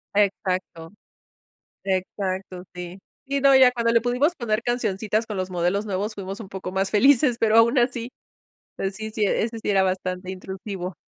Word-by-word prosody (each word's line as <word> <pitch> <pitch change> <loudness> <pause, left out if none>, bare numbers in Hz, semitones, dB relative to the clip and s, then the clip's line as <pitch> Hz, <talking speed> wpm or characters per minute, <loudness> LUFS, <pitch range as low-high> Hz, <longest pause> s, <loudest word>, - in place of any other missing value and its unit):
Exacto, 185 -4 -1 0.9
exacto, 185 -1 -3
sí. 180 +1 -7 0.3
Sí, 280 0 -1
no, 275 0 +6
ya 255 -1 +7
cuando 235 -1 +1
le 230 - +4
pudimos 250 +8 +1
poner 225 -1 -1
cancioncitas 220 -2 -1
con 210 - -5
los 185 0 -3
modelos 180 +4 0
nuevos 205 +2 -2
fuimos 195 +1 -6
un 195 - -8
poco 190 -1 -6
más 190 +1 0
felices, 250 +3 +4
pero 225 -1 +3
aún 235 +3 +5
así 240 0 0 0.7
pues 195 0 -3
sí, 220 +1 -5
sí, 215 -1 -1
ese 225 +3 0
sí - - -4
era 195 -2 +4
bastante 185 0 -2
intrusivo. 190 -1 -6
205 Hz, 170 wpm, -24 LUFS, 185-230 Hz, 0.9 s, ya